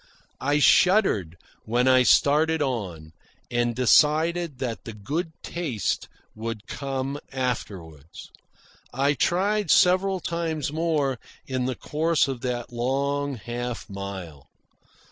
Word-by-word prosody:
I 145 +2 +1
shuddered 150 - +4 0.3
when 120 +3 +1
I 130 0 +6
started 155 +5 +4
on, 95 - -3 0.4
and 120 -1 0
decided 155 +5 +3
that 120 -3 -4
the 115 - -7
good 150 - -3
taste 150 - -2 0.2
would 110 -1 -6
come 135 0 -4
afterward. 95 - -4 0.8
I 140 +3 +1
tried 200 - +1
several 185 +1 +4
times 160 -4 -3
more 155 -6 0 0.3
in 130 -1 -2
the 130 - -2
course 160 +3 +1
of 130 -3 -4
that 120 -1 -4
long 140 +3 -1
half 120 +2 -5
mile. 95 -7 -7
130 Hz, 110 wpm, -25 LUFS, 115-155 Hz, 0.8 s, I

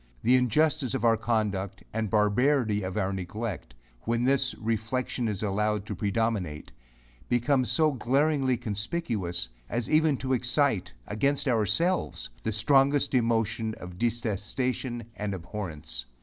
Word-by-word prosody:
The 125 +3 +5
injustice 130 0 +2
of 120 - -1
our 115 -1 +5
conduct, 105 -4 -1
and 110 -1 -1
barbarity 110 +1 +2
of 95 +1 -4
our 100 -1 0
neglect, 95 - -5 0.3
when 115 +1 0
this 135 0 +2
reflexion 115 +2 -2
is 105 -1 -2
allowed 105 0 0
to 105 - -4
predominate, 100 -6 -1 0.6
becomes 125 +1 +2
so 155 -1 +3
glaringly 135 +1 +1
conspicuous, 105 - -2 0.2
as 120 -1 -1
even 155 -2 +4
to 130 +1 -1
excite, 125 - +1
against 140 - 0
ourselves, 120 - +1
the 110 - -1
strongest 135 +7 +3
emotion 115 -2 +1
of 90 0 -10
detestation 120 +2 -2
and 105 -2 -3
abhorrence. 80 - -6
115 Hz, 125 wpm, -28 LUFS, 105-130 Hz, 0.6 s, The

